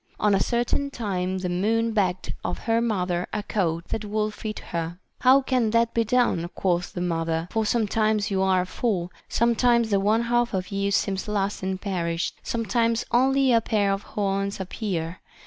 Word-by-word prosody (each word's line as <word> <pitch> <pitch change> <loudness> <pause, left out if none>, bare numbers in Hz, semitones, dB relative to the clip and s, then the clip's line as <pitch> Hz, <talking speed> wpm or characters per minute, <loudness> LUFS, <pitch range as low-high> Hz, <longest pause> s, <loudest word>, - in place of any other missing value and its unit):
On 210 -1 +3
a 195 - +3
certain 240 +4 0
time 190 -7 -2
the 185 -1 -3
moon 220 +6 +1
begged 185 -4 0
of - - -2
her 230 0 +2
mother 180 -6 -1
a 210 - -2
coat 170 -5 -1
that 220 - -2
would 210 0 -1
fit 215 0 -5
her. 170 0 -4 0.2
How 265 +2 +5
can 255 -4 +1
that 230 +1 +2
be 230 - +2
done, 225 -7 +1
quoth 180 -1 0
the 175 - -4
mother, 165 -1 -1
for 220 -1 0
sometimes 215 -2 +1
you 190 -1 +1
are 185 -1 +2
full, 185 -3 -2 0.2
sometimes 235 -1 +3
the 200 - +3
one 215 +4 +2
half 240 -2 +1
of 185 +1 -3
you 200 0 0
seems 195 -1 0
lost 205 -1 -1
and 190 0 -2
perished, 175 -4 -2
sometimes 230 0 0
only 265 +1 +4
a 230 - +5
pair 210 -3 +1
of 195 - -3
horns 200 -1 -2
appear. 180 -3 -3
205 Hz, 180 wpm, -25 LUFS, 185-230 Hz, 0.2 s, How